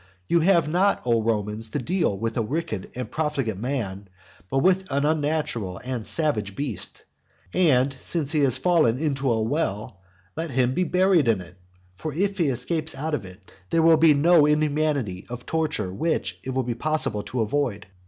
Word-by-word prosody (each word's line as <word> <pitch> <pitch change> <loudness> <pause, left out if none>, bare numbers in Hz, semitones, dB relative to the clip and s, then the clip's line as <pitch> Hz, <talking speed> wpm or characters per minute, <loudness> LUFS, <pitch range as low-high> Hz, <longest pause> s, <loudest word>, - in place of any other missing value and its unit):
You 170 - +3
have 170 -2 +3
not, 185 +6 +2
O 115 -2 +2
Romans, 110 0 -1
to 145 - -3
deal 150 - 0
with 115 +2 -3
a 115 - +1
wicked 110 - -3
and 125 0 -5
profligate 140 -9 -1
man, 105 -6 -3 0.4
but 135 - -1
with 190 0 +2
an 140 +1 +1
unnatural 150 - -1
and 125 -2 -4
savage 105 -10 0
beast. 135 -9 -4 0.5
And, 135 -6 +3
since 150 -2 -2
he 155 - +1
has 135 -3 +3
fallen 155 -6 +3
into 135 -3 0
a 115 - +1
well, 110 -4 -2 0.4
let 165 +1 -3
him 130 -1 +1
be 180 +4 +1
buried 180 -4 +3
in 110 -4 +3
it. 90 0 -11 0.4
For 155 +12 -5
if 195 +3 -1
he 165 - +3
escapes 155 +5 -1
out 155 +3 -3
of 115 -9 -2
it, 95 +1 -14 0.2
there 165 - +2
will 165 -1 +6
be 155 -1 +6
no 155 +1 +5
inhumanity 150 -9 0
of 125 0 -7
torture 160 -12 -1
which 160 - -1
it - - -6
will 130 0 0
be 120 0 -2
possible 120 -4 -1
to 125 +3 -3
avoid. 115 -1 -1
140 Hz, 185 wpm, -24 LUFS, 115-160 Hz, 0.5 s, will